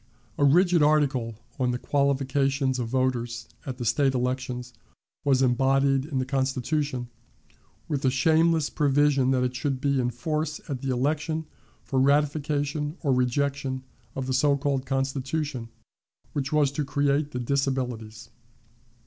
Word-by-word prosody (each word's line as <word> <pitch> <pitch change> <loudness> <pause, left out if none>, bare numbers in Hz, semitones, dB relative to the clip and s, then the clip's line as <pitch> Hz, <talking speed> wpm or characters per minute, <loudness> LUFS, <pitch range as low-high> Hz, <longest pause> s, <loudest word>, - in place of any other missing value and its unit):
A - - +3
rigid 175 +4 +5
article 140 -6 +2 0.2
on 125 -1 +2
the 125 - 0
qualifications 135 -1 +1
of 120 - -2
voters 120 -2 -1 0.2
at 130 -2 -4
the 120 - -4
State 135 +3 +2
elections 125 0 -2 0.5
was 135 -2 +3
embodied 135 +2 +2
in 145 -3 -4
the 130 - 0
Constitution, 135 0 -1 0.8
with 145 -3 -1
the 130 - +3
shameless 160 +3 +3
provision 145 -2 +3
that 130 -1 +2
it 125 0 -1
should 135 0 -1
be 140 0 +1
in 125 -1 +1
force 155 +5 -2
at 135 -4 -4
the 135 - -3
election 150 +5 -1 0.4
for 135 - -1
ratification 145 +2 +1
or 140 -3 +2
rejection 130 +1 0 0.3
of 135 - -3
the 130 - -2
so 140 +2 +3
called 140 -2 -1
Constitution 135 -1 -2 0.6
which 140 -2 -2
was 150 -3 +3
to 145 +1 -2
create 140 +1 +1
the 125 - -4
disabilities. 125 -4 -2
135 Hz, 140 wpm, -26 LUFS, 130-145 Hz, 0.8 s, rigid